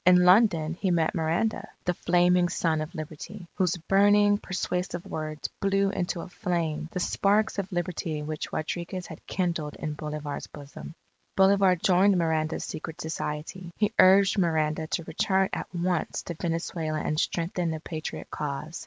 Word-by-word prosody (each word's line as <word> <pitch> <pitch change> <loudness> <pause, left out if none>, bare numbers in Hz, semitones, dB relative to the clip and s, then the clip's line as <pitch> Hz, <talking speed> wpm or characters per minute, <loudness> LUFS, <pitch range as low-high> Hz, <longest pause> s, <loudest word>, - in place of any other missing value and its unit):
In 180 0 +6
London 180 -5 +5
he 185 +2 -1
met 165 -2 +2
Miranda, 165 +7 0 0.2
the 180 - +2
Flaming 175 +1 +3
Son 160 -2 0
of 155 +4 -6
Liberty, 165 +4 -7
whose 180 -1 +1
burning, 205 +3 +4
persuasive 180 -2 -3
words 155 -1 -4
blew 195 0 +2
into 175 -3 -2
a - - -7
flame, 165 -3 -2
the - - -3
sparks 205 +4 +1
of 195 +1 -4
Liberty 175 -4 -2
which 155 0 -5
Rodriguez 175 +3 -3
had 160 - -10
kindled 170 -5 -2
in 155 - -4
Bolivar's 150 -1 -5
bosom. 145 +2 -10 0.4
Bolivar 195 -1 +5
joined 185 +2 +4
Miranda's 160 -2 0
secret 160 +1 -7
society. 160 +2 -4
He 210 0 +1
urged 195 +2 +6
Miranda 160 -2 +1
to 170 - -2
return 190 +4 +1
at - - -3
once 175 -1 -1
to 170 - -5
Venezuela 165 -1 -2
and 150 0 -1
strengthen 170 +1 -1
the 160 -1 -3
Patriot 155 0 -6
cause. 150 +2 -4
175 Hz, 155 wpm, -27 LUFS, 155-185 Hz, 0.4 s, In